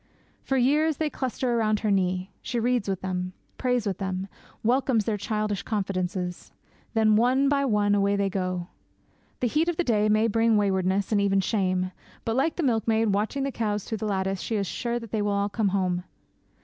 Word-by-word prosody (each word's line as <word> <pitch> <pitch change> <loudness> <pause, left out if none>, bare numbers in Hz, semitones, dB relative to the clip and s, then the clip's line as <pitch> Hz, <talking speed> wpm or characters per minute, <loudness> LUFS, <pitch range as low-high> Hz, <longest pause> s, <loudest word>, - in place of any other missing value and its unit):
For 270 - -1
years 295 +4 +3
they 310 -2 -1
cluster 255 -1 -1
round 215 -2 +1
her 215 - +1
knee; 185 0 0
she 240 0 -2
reads 240 -3 +1
with 190 -2 -2
them; 185 -1 -3 0.3
prays 250 -3 +1
with 195 -3 -2
them; 190 0 -3 0.4
welcomes 240 -2 +2
their 220 - 0
childish 210 0 -2
confidences. 185 -3 -3 0.4
Then, 215 -1 +4
one 255 +5 +3
by 280 -1 +2
one, 210 -4 +2
away 200 0 +2
they 200 0 +1
go! 185 -2 -2 0.7
The 250 - +2
heat 310 +8 +1
of 345 - -2
the 355 - +2
day 215 -6 +2
may 215 +1 +4
bring 225 0 +3
waywardness, 190 0 +1
and 205 -2 +3
even 195 -1 +2
shame; 185 -2 0 0.3
but, 225 - 0
like 285 +5 +1
the 345 - -2
milkmaid 225 -3 +2
watching 215 +7 0
the 275 - -1
cows 210 -4 -1
through 220 - -4
the 215 - -2
lattice, 190 -1 -1
she 225 - -2
is 200 -2 0
sure 235 +5 -2
they 225 -2 -3
will 205 0 0
all 200 0 0
come 210 0 0
home. 185 -2 0
210 Hz, 195 wpm, -26 LUFS, 195-235 Hz, 0.7 s, Then